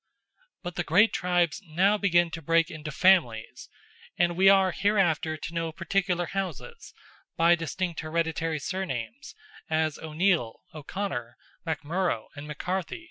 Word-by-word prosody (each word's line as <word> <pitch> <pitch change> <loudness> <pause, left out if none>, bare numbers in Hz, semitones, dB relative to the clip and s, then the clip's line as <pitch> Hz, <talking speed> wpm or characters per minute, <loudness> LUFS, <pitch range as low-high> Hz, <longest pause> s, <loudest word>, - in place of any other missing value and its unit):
But 175 -1 -6
the 175 - 0
great 205 +8 +4
tribes 175 +1 +1
now 185 +5 +2
begin 175 -5 +2
to 165 - -6
break 165 +1 +2
into 155 -1 -7
families, 145 -11 +2 0.5
and 175 0 +2
we 190 +2 +6
are 195 -1 +5
hereafter 175 -6 +1
to 160 - -7
know 165 -1 -2
particular 180 +1 -1
houses, 195 - -5 0.5
by 170 +1 +5
distinct 170 +1 -2
hereditary 160 0 -1
surnames, 185 - -5 0.3
as 155 -1 0
O'Neill, 160 -6 0
O'Conor, 150 -6 -5 0.3
MacMurrough, 160 - -2
and 145 +1 -8
McCarthy. 180 - -3
170 Hz, 130 wpm, -27 LUFS, 155-190 Hz, 0.5 s, we